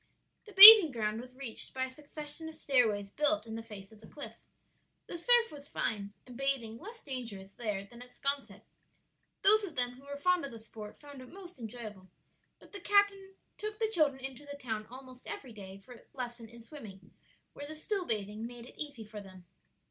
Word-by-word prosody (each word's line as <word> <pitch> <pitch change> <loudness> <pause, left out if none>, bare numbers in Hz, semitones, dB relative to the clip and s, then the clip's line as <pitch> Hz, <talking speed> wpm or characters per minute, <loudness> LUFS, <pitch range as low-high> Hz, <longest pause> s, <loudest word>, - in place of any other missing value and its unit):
The 420 - -13
bathing 400 -2 +13
ground 220 -3 -3
was 255 +1 -15
reached 260 -3 -3
by 260 - -2
a 260 - -10
succession 300 +3 -8
of 320 - -12
stairways 220 -9 0
built 300 -1 0
in 225 - -9
the 225 - -6
face 210 -3 -12
of 220 -1 -18
the 215 - -15
cliff. 290 - -10 0.7
The - - -8
surf 480 +4 +3
was 290 -1 -12
fine, 205 -7 -4
and 250 - -13
bathing 250 -4 -3
less 450 +4 -12
dangerous 225 -8 -8
there 210 -5 -4
than 235 +4 -15
at 250 - -12
'Sconset. 280 +1 -5 0.8
Those 430 +2 +6
of 345 -6 -7
them 245 -1 0
who 255 +3 -17
were 285 0 -7
fond 360 +3 +1
of 280 - -7
the 230 - -10
sport 220 -1 -12
found 285 -2 -13
it 255 - -13
most 365 -5 -13
enjoyable; 215 -5 -10 0.5
but - - -20
the 405 - -9
captain 400 -1 +1 0.2
took 425 0 -6
the 445 -1 -2
children 285 -8 0
into 270 +1 -9
the 285 0 -10
town 220 -5 -6
almost 255 0 -13
every 255 -4 -8
day 195 -2 -11
for 195 +6 -15
a 240 - -16 0.2
lesson 240 -2 -7
in 235 0 -15
swimming, 215 - -13 0.4
where 285 - -9
the 310 - -9
still 375 +4 -4
bathing 210 -1 -4
made 240 -1 -11
it - - -11
easy 285 -7 -6
for 210 0 -10
them. 185 -2 -15
255 Hz, 205 wpm, -31 LUFS, 220-300 Hz, 0.8 s, bathing